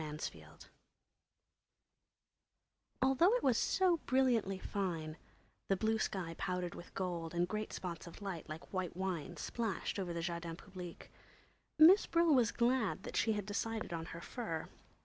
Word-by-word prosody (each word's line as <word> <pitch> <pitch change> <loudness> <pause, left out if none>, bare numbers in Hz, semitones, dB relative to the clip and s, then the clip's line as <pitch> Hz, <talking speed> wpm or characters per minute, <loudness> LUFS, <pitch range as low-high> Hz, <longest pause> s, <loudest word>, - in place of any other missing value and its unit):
Miss 150 0 -4
Brill - - -15 2.5
Although 270 - +5
it - - 0
was 255 -3 +4
so 365 +6 +3
brilliantly 245 -7 +3
fine—the 180 0 -4
blue 220 +2 +1
sky 180 -6 -2
powdered 180 -2 -2
with 175 - -11
gold 175 -3 -3
and 175 +1 +2
great 215 +2 -3
spots 175 -2 -5
of 170 - -10
light 190 -6 -5
like 155 +5 -8
white 185 -2 -2
wine 180 -3 -3
splashed 220 +3 -2
over 180 -3 -2
the 170 0 -2
Jardins 170 -1 -3
Publiques—Miss 195 - +1
Brill 335 -2 +4
was 245 -5 +4
glad 235 -5 +1
that - - -6
she 220 - +3
had 205 -2 -2
decided 220 -1 -2
on 165 -1 -3
her 170 0 -7
fur. 170 -10 -4
190 Hz, 145 wpm, -36 LUFS, 170-230 Hz, 2.5 s, Although